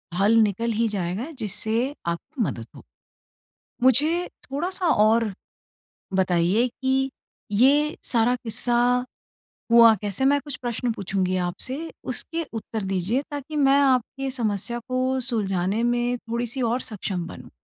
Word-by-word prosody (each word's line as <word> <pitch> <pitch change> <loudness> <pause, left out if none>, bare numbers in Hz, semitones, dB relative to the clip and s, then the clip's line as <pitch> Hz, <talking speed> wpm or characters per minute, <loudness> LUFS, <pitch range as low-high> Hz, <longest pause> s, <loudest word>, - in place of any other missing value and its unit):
हल 205 +4 +3
निकल 220 +3 0
ही 225 +1 +1
जाएगा, 200 - -3
जिससे 230 +2 -2
आपकी 235 - -4
मदद 120 - -4
हो। - - -12 1.0
मुझे 310 +8 +4 0.2
थोड़ा-सा 350 +6 -2
और 220 -3 +3 0.8
बताइए 185 +5 +2
कि 265 +1 +1 0.4
ये 285 +8 +3
सारा 240 +1 +2
किस्सा 245 +1 +1 0.7
हुआ 230 -1 +8
कैसे? 205 +5 -1
मैं 285 +1 +4
कुछ 290 0 -7
प्रश्न 240 0 -2
पूछूँगी 190 -2 -1
आपसे, 265 - -4
उसके 325 +6 -3
उत्तर 225 -1 -5
दीजिए 195 +8 0
ताकि 290 +1 -6
मैं 275 -1 +4
आपकी 270 0 +1
समस्या 235 -1 -2
को 255 +1 0
सुलझाने 205 -4 +2
में 240 0 0
थोड़ी-सी 240 +2 -3
और 240 +2 0
सक्षम 195 -7 -4
बनूँ। 125 -5 -11
240 Hz, 125 wpm, -24 LUFS, 205-265 Hz, 1.0 s, हुआ